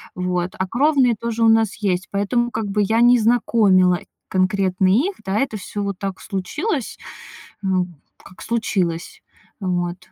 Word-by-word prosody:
вот. 180 0 -2
А 190 - -1
кровные 260 +1 +3
тоже 230 0 -2
у 225 - +6
нас 225 -2 +3
есть, 190 -3 -1
поэтому 240 +5 0
как 220 -1 -3
бы 205 +1 +1
я 225 +3 +2
не 245 +1 +6
знакомила 210 -6 +3 0.3
конкретно 185 0 +1
их, 280 - +2
да, 195 +2 0
это 245 -5 -1
всё 205 +1 -5
вот 200 -2 -3
так 195 -1 -4
случилось, 265 - -3 0.7
м, 185 -2 -1 0.3
как 185 - -15
случилось, 190 -7 -2 0.4
вот. 175 -2 -2
200 Hz, 150 wpm, -21 LUFS, 185-235 Hz, 0.7 s, у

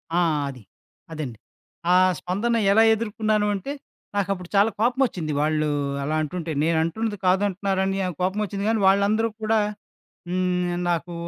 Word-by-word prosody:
ఆ! - - +4 0.3
అది. 130 -4 -10 0.5
అదండి. 140 -8 -5 0.6
ఆ - - +6 0.2
స్పందన 205 +6 -1 0.2
ఎలా 220 +3 +6
ఎదుర్కున్నాను 215 -1 0
అంటే? 275 +9 -4 0.4
నాకప్పుడు 195 -3 -2
చాలా 200 +3 +5
కోపమొచ్చింది 235 - +1
వాళ్ళు 155 0 +1 0.4
అలా 155 +2 -1
అంటుంటే. 165 +2 -4
నేనంటున్నది 165 +7 0
కాదంటున్నారని 195 0 +1
ఆహ్, 180 - -3
కోపమొచ్చింది 200 +1 -1
కానీ, 225 -1 +1
వాళ్ళందరూ 205 +3 +3
కూడా 220 0 +3 0.7
హ్మ్. 180 -1 0
నాకు 170 0 -1
190 Hz, 120 wpm, -24 LUFS, 175-215 Hz, 0.7 s, ఆ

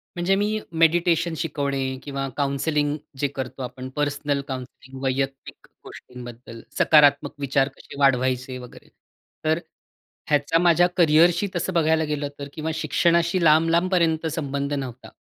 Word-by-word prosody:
म्हणजे 175 +2 +1
मी 210 +2 0 0.2
मेडिटेशन 170 0 +3
शिकवणे 140 -3 -2 0.2
किंवा 140 -1 -4
काउंसलिंग 145 +1 0 0.2
जे 145 - +1
करतो 135 -1 -6
आपण 130 +1 -7
पर्सनल 145 -1 -1
काउंसलिंग 130 0 -8
वैयक्तिक 135 +1 -3 0.2
गोष्टींबद्दल 120 -2 -11 0.2
सकारात्मक 145 -2 +4
विचार 135 -1 +1
कसे 140 - -12
वाढवायचे 130 -1 +1
वगैरे. 125 -1 -12 0.6
तर 160 +1 +2 0.7
ह्याचा 145 +2 +2
माझ्या 175 0 +4
करिअरशी 170 +3 +4
तसं 180 +2 -2
बघायला 160 -1 +2
गेलं 150 -1 -2
तर 140 - -5
किंवा 160 0 -3
शिक्षणाशी 170 +3 +1
लांब-लांबपर्यंत 165 +1 +3
संबंध 140 -1 -2
नव्हता. 130 -3 -5
145 Hz, 120 wpm, -23 LUFS, 135-165 Hz, 0.7 s, सकारात्मक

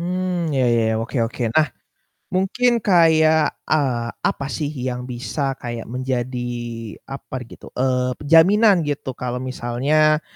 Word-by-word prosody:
Mmm, 180 -1 -1
iya 130 - +3
iya, 115 - +3 0.2
oke 115 +5 -5
oke. 120 +2 -6
Nah, 155 -1 +4 0.7
mungkin 235 +6 +2
kayak, 160 -6 +4
eee, 130 -6 +1 0.2
apa 140 - -3
sih 150 -3 -2
yang 125 -3 -4
bisa 130 +2 -3
kayak 120 -2 -6
menjadi 125 0 -2 0.7
upper 135 -1 -6
gitu, - - -13
eee, 125 0 0 0.2
jaminan 200 +5 +6
gitu. 145 -2 -3
kalau 125 0 -3
misalnya 140 +5 +1
140 Hz, 130 wpm, -21 LUFS, 125-160 Hz, 0.7 s, jaminan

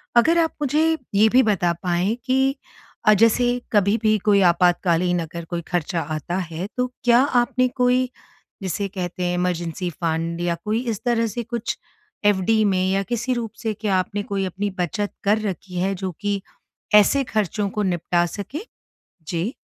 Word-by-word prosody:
अगर 315 +9 +5
आप 325 -1 +2
मुझे 310 +3 +2 0.2
ये 210 +2 +5
भी 255 +3 +5
बता 180 -6 +2
पाएँ 180 +4 +1
की 265 +1 +2 0.5
अ, 215 - +8
जैसे 240 +3 +3
कभी 205 0 +3
भी 215 -1 +3
कोई 200 -2 +5
आपातकालीन 175 0 +3
अगर 170 +1 -6
कोई 170 +1 -4
खर्चा 175 -1 -1
आता 155 +2 -4
है, 175 0 -4
तो 250 0 +1 0.2
क्या 240 0 +5
आपने 255 -1 +2
कोई 250 0 +1 0.5
जिसे 195 +1 -2
कहते 180 -2 -4
हैं 175 0 0
इमरजेंसी 180 0 -2
फंड 165 +1 -1
या 175 -1 0
कोई 215 +2 0
इस 215 -3 -3
तरह 230 -1 +2
से 235 +3 -4
कुछ 235 0 -3 0.5
एफडी 205 +2 +3
में 190 -2 +2
या 195 +1 +1
किसी 240 +2 0
रूप 235 -3 -3
से 220 -1 0
क्या 210 -2 -1
आपने 195 +3 -1
कोई 200 -1 -2
अपनी 195 +3 -2
बचत 190 +4 -1
कर 210 +2 +3
रखी 190 -3 -4
है 190 +2 +1
जो 190 0 -4
कि 205 -1 -1 0.5
ऐसे 210 +7 +5
खर्चों 210 -3 -1
को 210 +2 -2
निपटा 175 -1 +1
सके? 205 - -6 0.7
जी। 175 - -2
200 Hz, 170 wpm, -22 LUFS, 180-235 Hz, 0.7 s, अ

